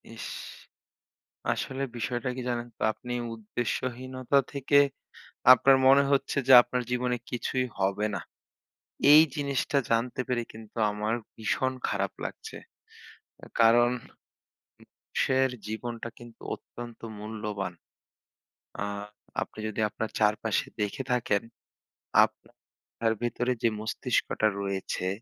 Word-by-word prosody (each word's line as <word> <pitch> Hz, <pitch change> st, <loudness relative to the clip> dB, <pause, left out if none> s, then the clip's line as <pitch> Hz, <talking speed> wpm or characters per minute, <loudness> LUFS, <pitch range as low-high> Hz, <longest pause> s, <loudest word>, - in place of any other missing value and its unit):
ইশ! -, -, -7 dB, 1.3 s
আসলে 135 Hz, +1 st, -3 dB
বিষয়টা 120 Hz, +2 st, -2 dB
কি 130 Hz, -, -4 dB
জানেন 120 Hz, -1 st, -2 dB
তো, -, -, -9 dB
আপনি 125 Hz, +2 st, -8 dB, 0.2 s
উদ্দেশ্যহীনতা 130 Hz, +4 st, -1 dB
থেকে 140 Hz, 0 st, +3 dB, 0.7 s
আপনার 135 Hz, +1 st, +6 dB
মনে 135 Hz, +1 st, +7 dB
হচ্ছে 140 Hz, 0 st, +1 dB
যে -, -, +8 dB
আপনার 125 Hz, +1 st, -2 dB
জীবনে 125 Hz, 0 st, 0 dB
কিছুই 125 Hz, +1 st, -1 dB
হবে 100 Hz, +2 st, +1 dB
না। -, -, -2 dB, 0.9 s
এই 155 Hz, +1 st, +10 dB
জিনিসটা 140 Hz, -1 st, 0 dB
জানতে 120 Hz, +3 st, +1 dB
পেরে 120 Hz, -2 st, 0 dB
কিন্তু 110 Hz, 0 st, -13 dB
আমার 105 Hz, +2 st, -1 dB, 0.2 s
ভীষণ 130 Hz, +4 st, 0 dB, 0.2 s
খারাপ 100 Hz, -1 st, -1 dB
লাগছে। -, -, -7 dB, 1.0 s
কারণ 120 Hz, +1 st, +6 dB, 1.0 s
মানুষের 130 Hz, 0 st, +1 dB, 0.2 s
জীবনটা 115 Hz, +1 st, -4 dB
কিন্তু 120 Hz, -1 st, -14 dB
অত্যন্ত 120 Hz, -1 st, -10 dB, 0.2 s
মূল্যবান। 105 Hz, -3 st, -4 dB, 1.1 s
আ -, -, -1 dB, 0.6 s
আপনি -, -, -6 dB
যদি 110 Hz, -, -5 dB
আপনার 110 Hz, +2 st, -4 dB
চারপাশে 105 Hz, 0 st, +2 dB, 0.2 s
দেখে 105 Hz, +6 st, -2 dB
থাকেন, 115 Hz, -5 st, +2 dB, 0.8 s
আপনার 115 Hz, -1 st, -6 dB
ভেতরে 120 Hz, +1 st, 0 dB
যে 115 Hz, -, +5 dB
মস্তিষ্কটা 110 Hz, 0 st, 0 dB
রয়েছে 95 Hz, -2 st, -2 dB
120 Hz, 105 wpm, -28 LUFS, 110-130 Hz, 1.3 s, এই